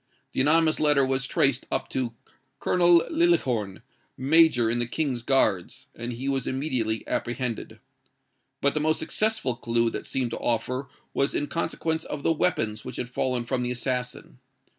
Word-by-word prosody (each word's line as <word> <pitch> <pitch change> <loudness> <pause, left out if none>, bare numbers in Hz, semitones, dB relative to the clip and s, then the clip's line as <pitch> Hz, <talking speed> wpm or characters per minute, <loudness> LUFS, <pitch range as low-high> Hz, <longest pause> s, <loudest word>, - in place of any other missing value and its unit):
The - - +1
anonymous 155 +3 +3
letter 145 -3 +4
was 130 -1 0
traced 135 -2 +1
up - - -1
to 120 -3 -2 0.4
Colonel 175 -2 +4
Liljehorn, 130 - +1 0.3
Major 140 -3 +4
in 120 +2 0
the 120 - 0
King's 130 -2 -1
Guards, 110 -8 +1
and 120 +1 -5
he 130 +4 -5
was 135 -2 -1
immediately 130 -5 -1
apprehended. 120 -1 -3 0.8
But 140 - +2
the 150 - 0
most 155 +1 +1
successful 215 - 0
clue 115 0 +1
that - - -6
seemed 125 -3 -1
to - - -4
offer 125 +3 -1 0.2
was 140 +1 0
in 145 - 0
consequence 160 0 -2
of 145 -1 -6
the 165 - +3
weapons 110 -10 0
which - - -7
had 120 - -4
fallen 125 -1 -1
from 125 +1 -1
the 125 - -1
assassin. 125 0 -3
130 Hz, 160 wpm, -26 LUFS, 120-150 Hz, 0.8 s, letter